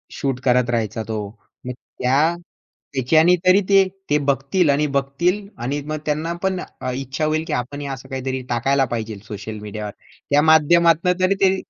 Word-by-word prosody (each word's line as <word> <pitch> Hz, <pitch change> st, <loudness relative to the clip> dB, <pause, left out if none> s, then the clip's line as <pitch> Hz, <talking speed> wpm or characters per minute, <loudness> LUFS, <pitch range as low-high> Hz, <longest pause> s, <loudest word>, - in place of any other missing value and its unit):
Shoot 135 Hz, -2 st, -2 dB
करत 125 Hz, -1 st, +3 dB
राहायचा 110 Hz, -2 st, -1 dB
तो. 110 Hz, -1 st, -3 dB, 0.4 s
मग 125 Hz, -, -4 dB, 0.3 s
त्या, 145 Hz, +7 st, +2 dB, 0.6 s
त्याच्याने 155 Hz, +7 st, +4 dB
तरी 185 Hz, +3 st, +6 dB
ते 195 Hz, -1 st, +5 dB, 0.2 s
ते 150 Hz, -, +4 dB
बघतील 140 Hz, +5 st, +1 dB
आणि 145 Hz, +2 st, +2 dB
बघतील 175 Hz, +9 st, -1 dB, 0.2 s
आणि 140 Hz, +4 st, -2 dB
मग 155 Hz, 0 st, -3 dB
त्यांना 155 Hz, +3 st, -1 dB
पण 190 Hz, -1 st, 0 dB, 0.2 s
अ, 130 Hz, -, -2 dB
इच्छा 135 Hz, +3 st, -3 dB
होईल, 155 Hz, +1 st, 0 dB
की 155 Hz, -, -2 dB
आपणही 140 Hz, +3 st, -3 dB
असं 135 Hz, 0 st, -7 dB
काहीतरी 130 Hz, 0 st, -3 dB
टाकायला 135 Hz, +3 st, +2 dB
पाहिजे 110 Hz, -2 st, -5 dB
सोशल 105 Hz, +1 st, -7 dB
मीडियावर. 105 Hz, 0 st, -6 dB, 0.4 s
त्या 145 Hz, +1 st, +4 dB
माध्यमातनं 165 Hz, +3 st, +4 dB
तरी 190 Hz, +2 st, +3 dB
ते 190 Hz, 0 st, +4 dB
140 Hz, 165 wpm, -21 LUFS, 125-165 Hz, 0.6 s, तरी